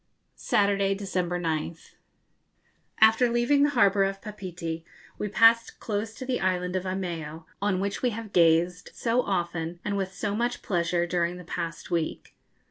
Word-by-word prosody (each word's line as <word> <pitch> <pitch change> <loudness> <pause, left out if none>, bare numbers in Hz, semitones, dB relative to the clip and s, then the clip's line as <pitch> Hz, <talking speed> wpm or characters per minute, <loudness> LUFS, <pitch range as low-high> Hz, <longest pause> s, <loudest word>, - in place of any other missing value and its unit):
_ - - -47 0.3
Saturday, 200 -1 +1
December 180 -3 -2
9th. 165 0 -3 1.1
After 225 +3 +6
leaving 240 +4 +3
the 290 - +5
harbour 200 -7 +4
of 195 0 -1
Papeete 180 -6 -6 0.4
we 210 - -1
passed 230 +2 +4
close 215 0 -3
to 260 - -7
the 250 -1 -1
island 180 -1 0
of 185 0 -1
Eimeo, 165 -4 -4 0.2
on 200 -2 +1
which 200 +1 -2
we 250 - +2
have 225 -2 -7
gazed 170 +1 +3
so 235 +1 +1
often 175 -4 -2
and 205 -1 -1
with 190 -1 -2
so 200 +2 -3
much 240 +2 -1
pleasure 175 -2 0
during 175 0 -1
the 180 - -9
past 165 -1 -5
week. 165 -2 -2
190 Hz, 160 wpm, -27 LUFS, 175-210 Hz, 1.1 s, After